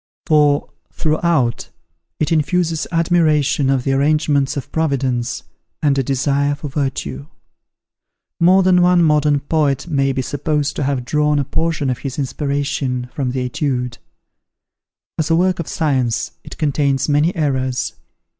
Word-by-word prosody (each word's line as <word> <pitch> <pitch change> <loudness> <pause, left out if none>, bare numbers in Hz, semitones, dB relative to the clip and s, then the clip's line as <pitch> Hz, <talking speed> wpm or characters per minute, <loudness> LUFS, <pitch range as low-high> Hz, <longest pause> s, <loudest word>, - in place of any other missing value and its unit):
For, 150 -3 +3 0.2
throughout, 155 -6 0 0.5
it 155 +2 0
infuses 165 +1 0
admiration 155 -5 +2
of 135 -2 +1
the 135 - 0
arrangements 145 0 +1
of 140 - -6
Providence, 130 -6 -1 0.4
and 145 -2 +3
a 135 - +2
desire 140 +2 0
for 145 0 -7
virtue. 130 - -3 1.1
More 185 +3 +5
than 180 -1 +4
one 180 -1 +4
modern 150 -2 +3
poet 145 -3 0
may 135 -5 +1
be 130 0 -2
supposed 150 +1 -1
to - - -1
have 135 -3 -1
drawn 150 +2 +1
a 140 - +1
portion 160 -3 -1
of 125 - -4
his 135 -1 -5
inspiration, 140 -3 -2
from 135 -3 -2
the 130 +1 -2
"Etudes." 125 -2 -2 1.2
As 160 0 0
a 165 - +4
work 180 +1 +1
of 170 - -4
science 130 -8 0
it - - -10
contains 140 -3 0
many 150 +4 +2
errors. 130 -5 -1
145 Hz, 140 wpm, -18 LUFS, 135-155 Hz, 1.2 s, More